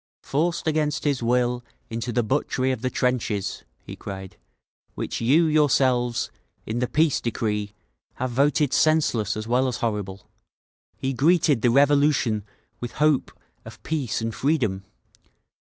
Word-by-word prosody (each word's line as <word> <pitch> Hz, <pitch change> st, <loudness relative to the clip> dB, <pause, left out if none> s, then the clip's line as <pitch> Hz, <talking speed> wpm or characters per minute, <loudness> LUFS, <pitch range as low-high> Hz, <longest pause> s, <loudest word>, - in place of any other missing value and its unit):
"Forced 165 Hz, +6 st, -1 dB
against 150 Hz, -2 st, 0 dB
his 140 Hz, -4 st, 0 dB
will 120 Hz, +1 st, +1 dB, 0.3 s
into 115 Hz, +2 st, -3 dB
the 120 Hz, +1 st, +1 dB
butchery 130 Hz, +1 st, 0 dB
of 130 Hz, -, -3 dB
the 130 Hz, -, 0 dB
trenches," 125 Hz, -6 st, -1 dB, 0.2 s
he -, -, -8 dB
cried, 95 Hz, -1 st, -8 dB, 0.6 s
"which -, -, -4 dB
you 145 Hz, +9 st, +4 dB
yourselves, 130 Hz, -6 st, +2 dB, 0.3 s
in 110 Hz, +2 st, -3 dB
the 125 Hz, -, 0 dB
Peace 155 Hz, +3 st, +2 dB
decree, 105 Hz, -3 st, -2 dB, 0.4 s
have 130 Hz, -1 st, -3 dB
voted 140 Hz, +2 st, +2 dB
senseless 120 Hz, -10 st, +2 dB
as 110 Hz, -, -4 dB
well 125 Hz, +3 st, +2 dB
as 125 Hz, -2 st, -2 dB
horrible, 105 Hz, -4 st, -3 dB, 0.7 s
he 135 Hz, 0 st, -2 dB
greeted 150 Hz, -1 st, +3 dB
the 120 Hz, -, +3 dB
Revolution 140 Hz, -4 st, +3 dB, 0.4 s
with 120 Hz, -1 st, -6 dB
hope 150 Hz, -2 st, +2 dB, 0.3 s
of -, -, -13 dB
peace 145 Hz, -8 st, -2 dB
and 115 Hz, 0 st, -2 dB
freedom. 115 Hz, -11 st, 0 dB
125 Hz, 140 wpm, -24 LUFS, 115-145 Hz, 0.7 s, you